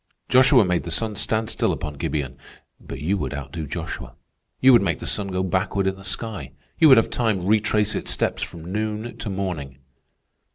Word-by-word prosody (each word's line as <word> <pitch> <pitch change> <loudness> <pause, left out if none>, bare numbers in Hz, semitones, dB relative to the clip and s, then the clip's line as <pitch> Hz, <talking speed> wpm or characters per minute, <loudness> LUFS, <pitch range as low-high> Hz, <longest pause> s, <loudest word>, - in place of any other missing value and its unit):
Joshua 130 -3 +6
made 90 -1 0
the 85 - -6
sun 110 +6 0
stand 110 +1 0
still - - +1
upon 75 -1 -4
Gibeon, 70 -1 -3 0.4
but 70 - -8
you 95 +7 0
would 75 - -3
outdo 70 +3 -6
Joshua. - - -6 0.4
You 130 0 +7
would 120 - +7
make 100 - 0
the - - -8
sun 100 -2 +1
go 95 -1 -1
backward 95 +1 0
in 95 0 0
the 95 - -13
sky. 95 - -4 0.3
You 160 - +7
would 130 - +9
have 115 - +3
time 110 -7 0
retrace 105 0 +2
its - - -3
steps - - 0
from 80 -1 -6
noon 110 +2 -3
to 105 - -4
morning. 90 -9 -4
100 Hz, 195 wpm, -23 LUFS, 80-110 Hz, 0.4 s, would